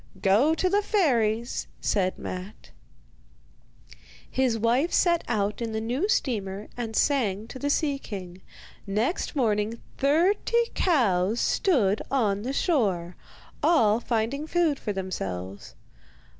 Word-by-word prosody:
'Go 230 +12 +3
to 370 - +1
the 400 +3 +2
fairies,' 240 - +1
said 185 -3 0
Matte. 185 +3 -8 1.6
His 255 -3 0
wife 240 +9 +1
set 340 -2 +3
out 210 -1 -1
in 225 -1 -3
the 220 - -1
new 250 - -1
steamer 210 - -1
and 230 -2 -5
sang 220 -8 +1
to 260 - -8
the 285 - -1
sea 285 -1 +1
king. 185 -6 -8 0.5
Next 225 - -1
morning 220 -3 0 0.2
thirty 385 - +2
cows 225 - +2
stood 220 - +2
on 210 -7 +1
the 250 +5 -3
shore, 200 - 0 0.5
all 260 -9 +4
finding 240 +6 -2
food 325 -4 +1
for 210 - -3
themselves. 100 - -5
230 Hz, 120 wpm, -26 LUFS, 200-290 Hz, 1.6 s, all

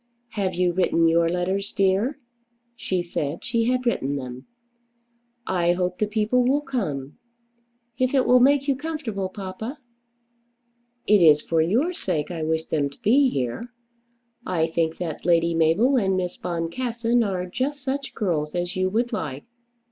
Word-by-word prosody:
"Have 195 -5 -2
you 180 0 +1
written 170 -2 +2
your 165 0 +3
letters, 185 +3 -1
dear?" 195 +8 +1 0.6
She 185 -6 -2
said 155 -2 -4
she 230 -1 +1
had 250 +1 0
written 145 - 0
them. 130 -2 -7 1.0
"I 175 -2 +2
hope 180 0 -2
the 210 - +1
people 220 +4 +1
will 275 +4 +2
come." 150 - -4 0.8
"If 255 +2 +1
it 265 - +3
will 250 0 +6
make 275 +2 +4
you 275 - +2
comfortable, 260 -10 -4
papa!" 200 +7 -6 1.3
"It 205 -2 +5
is 150 -3 +6
for 165 -1 +1
your 240 - +1
sake 170 - -2
I 165 -2 -4
wish 160 +1 -1
them 145 -3 0
to 140 - -18
be 260 +5 +4
here. 135 - -3 0.7
I 175 -6 0
think 165 0 -1
that 165 -4 -5
Lady 170 0 +3
Mabel 165 - +3
and 190 -5 +1
Miss 180 -1 -2
Boncassen 230 +8 -1
are 185 -4 -2
just 260 +9 -3
such 275 +1 -3
girls 160 -7 -1
as 175 0 -2
you 185 0 +1
would 235 +4 -1
like." 145 -9 -4
185 Hz, 155 wpm, -24 LUFS, 165-245 Hz, 1.3 s, will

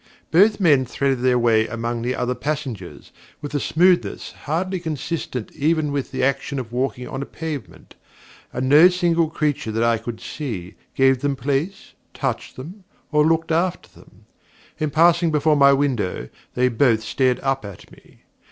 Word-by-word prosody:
Both 205 +7 +5
men 150 -8 +4
threaded 135 +1 -1
their 125 -1 +3
way 115 -2 +3
among 115 +1 -3
the 125 +2 -1
other 125 0 -1
passengers, 130 - -5 0.3
with 145 0 -7
a 145 - +1
smoothness 175 +5 +1
hardly 185 +5 -3
consistent 155 -6 -4
even 155 0 0
with 140 -2 -2
the - - -3
action 140 +1 0
of 120 -3 -5
walking 125 0 -2
on 135 - -5
a - - -4
pavement, 155 -6 -7 0.6
and 130 +1 -2
no 150 +6 +8
single 170 -3 +1
creature 150 -8 -1
that 115 +1 0
I 115 -1 +2
could 115 0 -6
see, 105 - -6 0.2
gave 135 -1 +4
them 145 -1 0
place, 140 +9 -3 0.2
touched - - -3
them, 175 +10 -10 0.3
or 150 -1 +4
looked 165 +1 +1
after 175 +2 0
them. - - -20 0.5
In 155 - 0
passing 170 +3 +4
before 155 0 +2
my 140 -1 +6
windows, 125 - -1 0.3
they 125 +1 +3
both 115 -2 +2
stared 130 +2 +1
up 135 -2 -1
at 100 -4 -11
me. - - -20
140 Hz, 165 wpm, -22 LUFS, 125-160 Hz, 0.6 s, no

